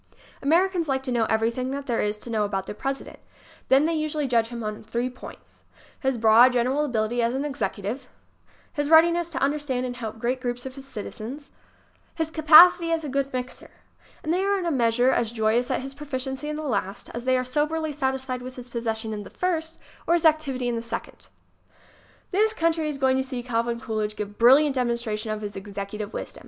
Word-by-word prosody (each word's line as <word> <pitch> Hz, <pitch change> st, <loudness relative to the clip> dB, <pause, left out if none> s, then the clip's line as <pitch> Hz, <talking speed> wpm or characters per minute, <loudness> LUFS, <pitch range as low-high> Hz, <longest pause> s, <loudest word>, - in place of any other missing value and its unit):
Americans 340 Hz, +3 st, +2 dB
like 265 Hz, -1 st, 0 dB
to 260 Hz, -, -3 dB
know 235 Hz, -2 st, +2 dB
everything 230 Hz, +4 st, 0 dB
there 270 Hz, -3 st, -2 dB
is 210 Hz, 0 st, -1 dB
to 230 Hz, +2 st, -9 dB
know 215 Hz, -2 st, +1 dB
about 195 Hz, -2 st, -2 dB
their -, -, -6 dB
President. 270 Hz, +5 st, -5 dB, 0.5 s
Then 270 Hz, +3 st, +5 dB
they 330 Hz, -, +1 dB
usually 310 Hz, -1 st, -1 dB
judge 230 Hz, -3 st, +2 dB
him 235 Hz, -1 st, -6 dB
on 215 Hz, 0 st, -5 dB
three 235 Hz, +3 st, -2 dB
points: 250 Hz, -, -13 dB, 0.4 s
his 265 Hz, -2 st, 0 dB
broad, 230 Hz, +3 st, +6 dB
general 255 Hz, +4 st, +1 dB
abil 235 Hz, -6 st, 0 dB
ity 240 Hz, +3 st, -1 dB
as 235 Hz, +2 st, +1 dB
an 275 Hz, +2 st, -1 dB
executive; 240 Hz, -2 st, -3 dB, 0.7 s
his 290 Hz, 0 st, -1 dB
readiness 335 Hz, +1 st, +5 dB
to 335 Hz, -, -6 dB
understand 275 Hz, -2 st, 0 dB
and 245 Hz, -1 st, -4 dB
help 225 Hz, -3 st, -6 dB
great 245 Hz, +3 st, -1 dB
groups 245 Hz, 0 st, -3 dB
of 260 Hz, -, -6 dB
citizens; 270 Hz, +1 st, -8 dB, 0.6 s
his 320 Hz, -1 st, -2 dB
capacity 330 Hz, +2 st, +7 dB
as 325 Hz, -1 st, 0 dB
a 295 Hz, -, -4 dB
good 275 Hz, +1 st, -1 dB
mixer. 255 Hz, 0 st, -6 dB, 0.5 s
And 315 Hz, -, 0 dB
they 365 Hz, -, +1 dB
are 400 Hz, 0 st, +2 dB
in 370 Hz, -, -3 dB
a 340 Hz, -, 0 dB
measure 245 Hz, -1 st, +3 dB
as 230 Hz, -3 st, 0 dB
joyous 230 Hz, +2 st, +1 dB
at -, -, 0 dB
his 270 Hz, +1 st, -7 dB
proficiency 270 Hz, 0 st, -5 dB
in 300 Hz, -, -3 dB
the 310 Hz, -, -5 dB
last 200 Hz, -7 st, -3 dB
as 235 Hz, +1 st, -6 dB
they 260 Hz, 0 st, +3 dB
are 255 Hz, -, -1 dB
soberly 305 Hz, +4 st, -1 dB
satisfied 265 Hz, -3 st, -2 dB
with 255 Hz, +1 st, -8 dB
his 250 Hz, -1 st, -9 dB
possession 225 Hz, -2 st, -3 dB
of 205 Hz, -1 st, -5 dB
the -, -, -11 dB
first 325 Hz, -3 st, -2 dB, 0.3 s
or 340 Hz, -, +4 dB
his 335 Hz, -, 0 dB
activity 280 Hz, -5 st, +2 dB
in 240 Hz, -, 0 dB
the 230 Hz, -, -2 dB
second. 230 Hz, 0 st, -7 dB, 1.0 s
This 430 Hz, +3 st, +2 dB
country 325 Hz, -4 st, 0 dB
is 290 Hz, -, -4 dB
going 265 Hz, -1 st, +2 dB
to 265 Hz, -, +1 dB
see 255 Hz, -2 st, -5 dB
Calvin 235 Hz, -1 st, -1 dB
Coolidge 215 Hz, -2 st, -3 dB
give 205 Hz, 0 st, -6 dB
brilliant 270 Hz, +5 st, +6 dB
demonstration 235 Hz, -4 st, -2 dB
of 215 Hz, 0 st, -3 dB
his 205 Hz, -1 st, -5 dB
executive 200 Hz, +1 st, -6 dB
wisdom. -, -, -7 dB
255 Hz, 205 wpm, -25 LUFS, 230-295 Hz, 1.0 s, capacity